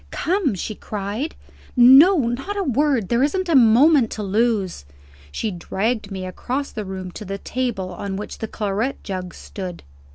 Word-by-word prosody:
"Come!" 330 - 0
she 205 +4 -4
cried. 210 +9 -4 0.4
"No! 270 +10 +8
not 270 +13 -3
a 400 - 0
word. 270 - +1
There 235 +1 +2
isn't 365 +7 0
a 330 - +2
moment 255 +2 +6
to 215 - -5
lose." 205 - 0 0.5
She 210 - -2
dragged 205 +5 -2
me 190 -2 -5
across 255 +9 -4
the 215 -2 -5
room 190 -1 -6
to 210 - -8
the 195 0 -5
table 215 -6 -3
on 195 +2 -5
which 205 +2 -7
the 220 - -3
claret 215 +5 -2
jug 185 -3 -5
stood. 185 -3 -8
220 Hz, 165 wpm, -22 LUFS, 195-270 Hz, 0.5 s, No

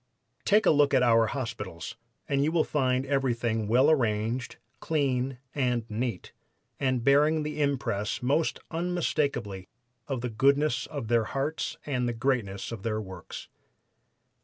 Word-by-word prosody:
Take 210 +1 +4
a - - +6
look 145 -2 +4
at 130 - +4
our 115 -2 +5
city - - -4
hospitals, 115 - -5 0.3
and 140 -1 +1
you 155 - +1
will 165 -2 +3
find 130 -2 0
everything 120 -5 0
well 125 +7 +5
arranged, 115 -2 0 0.2
clean 135 -4 0 0.2
and 125 -5 0
neat, 115 -3 -3 0.5
and 130 -3 0
bearing 150 +4 +4
the 150 0 -3
impress 125 -7 -1
most 145 +6 +1
unmistakably 150 - -1 0.4
of 135 -4 -2
the 125 - -2
goodness 140 +3 +2
of 140 -7 -5
their 115 -1 +2
hearts 140 +6 -2
and 125 -4 -1
the - - -2
greatness 115 -6 -1
of 115 -4 -6
their 110 0 -1
works. 95 -5 -8
130 Hz, 145 wpm, -28 LUFS, 115-145 Hz, 0.5 s, a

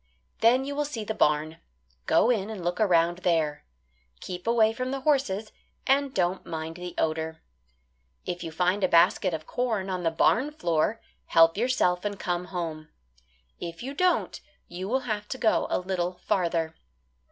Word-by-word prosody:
Then 250 +4 +4
you 285 +1 -4
will 295 - +1
see 285 -7 -4
the 220 - -3
barn. 155 -4 +1 0.5
Go 240 - +4
in 210 -3 -1
and 210 -5 -6
look 175 +1 -1
around 175 -3 +3
there. 160 -5 0 0.6
Keep 180 +3 -7
away 225 -1 +4
from 255 +2 -3
the 270 0 -3
horses 240 -8 +1 0.3
and 275 0 +2
don't 185 -3 0
mind 160 +1 -5
the 180 0 -7
odour. 160 0 -2 0.8
If 175 0 -4
you 165 - -5
find 180 +4 +1
a - - +5
basket 180 +2 +4
of 155 -1 -5
corn 220 -5 -1
on 185 -1 -2
the 165 - +2
barn 230 - +2
floor, 175 - 0 0.3
help 165 0 +5
yourself 205 -6 +1
and 205 -1 -3
come 175 0 -2
home. 165 -4 -5 0.7
If 170 +4 -6
you 270 +2 -5
don't 365 +4 +1 0.3
you 185 +3 -6
will 260 +3 +1
have 210 -4 -3
to 260 - -4
go 225 -4 +2
a - - +1
little 180 -1 -2
farther. 170 -4 -1
185 Hz, 170 wpm, -27 LUFS, 170-230 Hz, 0.8 s, a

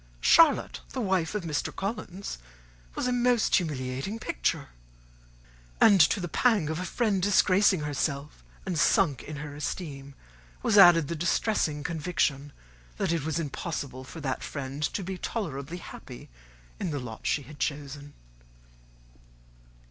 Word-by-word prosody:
Charlotte, 325 - +5
the 265 - -3
wife 190 -5 0
of 210 - -2
Mr. 155 -3 -2
Collins, 195 - -5 0.6
was - - -2
a 250 - +1
most 245 -1 +3
humiliating 140 - -3
picture! 60 - -2 1.1
And 200 -4 +7
to 165 +6 +4
the 175 - -3
pang 205 -3 +2
of 160 - -3
a 185 - -3
friend 200 0 0
disgracing 195 -2 +4
herself, 145 0 -3 0.2
and 180 -4 -1
sunk 145 -8 +3
in 155 - -8
her 145 0 -7
esteem, 140 -3 -5 0.5
was 215 - +2
added 175 -6 +8
the 170 - -3
distressing 165 -2 0
conviction 155 -4 -1 0.5
that - - 0
it 165 -4 0
was 160 +1 -1
impossible 140 -3 -4
for 145 +5 -10
that 130 -3 -2
friend 140 0 -5
to 175 +6 -1
be 185 0 -5
tolerably 165 - -4
happy 65 - -10 0.5
in - - -2
the 145 -2 -2
lot 120 -4 -7
she 145 - +1
had 145 +3 -13
chosen. 145 0 -4
160 Hz, 140 wpm, -28 LUFS, 145-190 Hz, 1.1 s, added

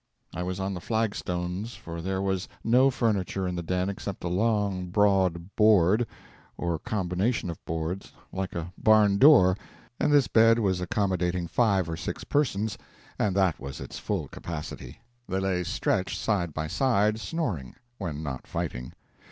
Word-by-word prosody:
I 90 - -4
was 90 +1 -3
on 95 +1 -2
the 90 - -5
flag 110 0 0
stones, 90 +5 -4
for 85 0 -7
there 95 +2 -2
was 95 -2 -1 0.2
no 125 +4 +5
furniture 100 -7 0
in 90 - -2
the 85 - -2
den 90 +2 -1
except 100 0 -5
a 85 - -1
long, 100 -1 0
broad 95 -2 +2
board, 105 +1 +4 0.5
or 85 -2 -1
combination 95 +1 -1
of 85 - -11
boards, 80 +4 -3 0.2
like 95 0 -3
a 85 +1 -4
barn 105 -2 +5
door, 130 -11 +7 0.4
and - - +2
this 145 -3 +5
bed 115 0 +5
was 95 -5 +1
accommodating 90 -2 0
five 100 -4 +2
or 80 -1 -4
six 95 - -5
persons, 110 -8 0 0.4
and 100 -3 +1
that 95 -5 +2
was 70 0 -7
its - - -7
full - - -2
capacity. 80 -3 -7 0.3
They 95 - 0
lay 95 -2 0
stretched 95 +2 -1
side 95 -6 0
by 80 +1 -3
side, 105 - +2
snoring 110 - -3 0.2
when 80 -6 -4
not 65 -4 -5
fighting. 60 +1 -4
95 Hz, 160 wpm, -27 LUFS, 90-105 Hz, 0.5 s, door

